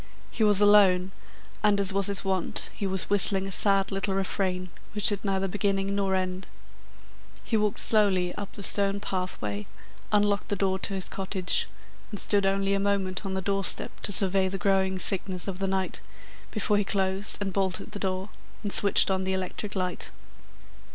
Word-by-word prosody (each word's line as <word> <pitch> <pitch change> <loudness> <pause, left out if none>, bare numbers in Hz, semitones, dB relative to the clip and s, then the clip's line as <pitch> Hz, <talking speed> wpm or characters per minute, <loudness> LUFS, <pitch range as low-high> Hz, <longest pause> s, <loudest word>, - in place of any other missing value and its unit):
He 225 - -1
was 205 -1 +5
alone, 195 -3 +5 0.5
and, 210 -1 +3
as 195 -1 +2
was 195 -1 +2
his 200 -1 -1
wont, 190 -2 -2
he 200 - -4
was 190 0 0
whistling 195 -1 +5
a 195 - -6
sad 195 0 +2
little 195 0 -1
refrain 185 -2 -2 0.2
which 210 -1 +4
had 205 -2 -2
neither 195 -1 -1
beginning 195 0 -1
nor 195 -1 0
end. 185 0 -3 1.0
He 230 - -2
walked 210 -1 0
slowly 190 -5 +2
up 205 -1 -7
the 200 - -9
stone 200 0 +1
pathway, 180 - -3 0.4
unlocked 205 -1 +1
the 205 - -1
door 190 -1 0
of - - -1
his 195 -2 -2
cottage, 190 -1 -1 0.4
and 205 - -7
stood 200 -2 +1
only 195 0 0
a 200 - +1
moment 195 -1 -1
on 190 - -3
the 190 - -3
doorstep 195 0 +1
to - - 0
survey 190 -1 +3
the 195 - -4
growing 190 0 +1
thickness 185 0 -3
of 190 -1 -4
the 195 - -1
night, 190 0 -2 0.5
before 210 -1 0
he - - +1
closed 195 0 +1
and 195 -2 -3
bolted 190 -1 -1
the 205 - -6
door 190 +1 -3 0.3
and 205 - -3
switched 200 -1 +5
on 190 0 0
the 190 0 -1
electric 190 +2 -4
light. 180 -1 -3
195 Hz, 180 wpm, -26 LUFS, 190-200 Hz, 1.0 s, was